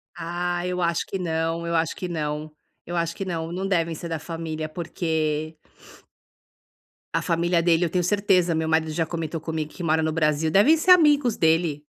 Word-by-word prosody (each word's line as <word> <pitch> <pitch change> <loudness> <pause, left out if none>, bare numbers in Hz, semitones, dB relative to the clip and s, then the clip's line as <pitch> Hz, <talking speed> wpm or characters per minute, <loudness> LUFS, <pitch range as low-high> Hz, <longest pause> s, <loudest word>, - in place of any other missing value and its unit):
Ah, 175 +1 -3
eu 180 0 -2
acho 170 0 0
que 195 - -4
não. 165 -1 -2
Eu 170 0 -1
acho 160 -1 0
que 180 - -5
não. 155 -2 -3 0.3
Eu 175 - -5
acho 170 0 -1
que 195 - -4
não. 165 -2 -4
Não 190 +2 -3
devem 170 -4 0
ser 170 +2 -7
da 160 -1 -3
família 160 -1 -5
porque 155 -1 -2 1.6
a - - +2
família 170 +1 +1
dele 170 0 +3
eu - - -1
tenho 180 +1 0
certeza 185 -4 +2
meu 160 0 -1
marido 160 -1 +1
já 165 +1 0
comentou 165 -1 -4
comigo 160 -2 -4
que 175 - -8
mora 160 0 +2
no 160 0 0
Brasil. 155 0 +1
Devem 230 - +5
ser 365 +4 +3
amigos 295 -9 +5
dele. 160 -2 +1
165 Hz, 190 wpm, -24 LUFS, 160-175 Hz, 1.6 s, Devem